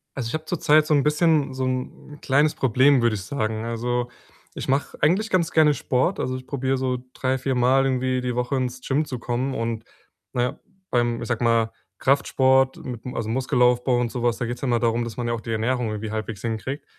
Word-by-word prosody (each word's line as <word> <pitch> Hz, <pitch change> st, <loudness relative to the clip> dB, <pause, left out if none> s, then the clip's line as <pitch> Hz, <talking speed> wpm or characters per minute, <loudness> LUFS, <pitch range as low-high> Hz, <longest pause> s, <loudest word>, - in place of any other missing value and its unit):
Also, 130 Hz, -4 st, -3 dB
ich -, -, -6 dB
habe 155 Hz, 0 st, -3 dB
zurzeit 155 Hz, -2 st, +3 dB
so 155 Hz, -, +2 dB
'n 145 Hz, -, +4 dB
bisschen 150 Hz, -2 st, +2 dB
so 130 Hz, 0 st, -2 dB
'n 130 Hz, +3 st, -5 dB
kleines 145 Hz, +3 st, +2 dB
Problem, 130 Hz, +2 st, +4 dB
würde 120 Hz, -2 st, +2 dB
ich 95 Hz, -, -5 dB
sagen. 110 Hz, -1 st, -2 dB
Also, 120 Hz, +1 st, -2 dB, 0.5 s
ich -, -, -5 dB
mache 135 Hz, +2 st, -1 dB
eigentlich 195 Hz, +8 st, +2 dB
ganz 175 Hz, -4 st, +1 dB
gerne 155 Hz, -2 st, +5 dB
Sport. 140 Hz, +8 st, 0 dB
Also, 130 Hz, 0 st, -1 dB
ich 130 Hz, 0 st, -8 dB
probiere 135 Hz, -1 st, -1 dB
so 130 Hz, -1 st, -1 dB, 0.2 s
drei 130 Hz, 0 st, 0 dB
viermal 130 Hz, 0 st, +2 dB
irgendwie 130 Hz, -1 st, 0 dB
die 125 Hz, -1 st, -2 dB
Woche 125 Hz, +3 st, -1 dB
ins 125 Hz, -1 st, -2 dB
Gym 145 Hz, +3 st, +1 dB
zu 125 Hz, -4 st, -5 dB
kommen 125 Hz, +3 st, -2 dB
und, 115 Hz, -1 st, -3 dB, 0.5 s
na 125 Hz, -, 0 dB
ja, 125 Hz, -, -2 dB, 0.3 s
beim, 120 Hz, -1 st, +1 dB
ich 115 Hz, -, -5 dB
sage 120 Hz, 0 st, -1 dB
mal, 115 Hz, -1 st, +2 dB, 0.3 s
Kraftsport 130 Hz, -1 st, +3 dB
mit'm 125 Hz, 0 st, -7 dB
also, 110 Hz, -2 st, -3 dB
Muskelaufbau 125 Hz, 0 st, +2 dB
und 120 Hz, -, 0 dB
so 125 Hz, -, -4 dB
was, 120 Hz, -1 st, +1 dB
da 125 Hz, -, -2 dB
geht's 120 Hz, +1 st, -5 dB
ja 135 Hz, -, -1 dB
immer 120 Hz, -1 st, +2 dB
darum, 115 Hz, 0 st, +1 dB
dass 115 Hz, 0 st, -7 dB
man 120 Hz, -, -2 dB
ja 120 Hz, -, 0 dB
auch 115 Hz, -, -4 dB
die 115 Hz, -, -6 dB
Ernährung 115 Hz, +1 st, 0 dB
irgendwie 110 Hz, 0 st, -4 dB
halbwegs 110 Hz, -2 st, -4 dB
hinkriegt 120 Hz, +5 st, -4 dB
125 Hz, 220 wpm, -24 LUFS, 120-135 Hz, 0.5 s, gerne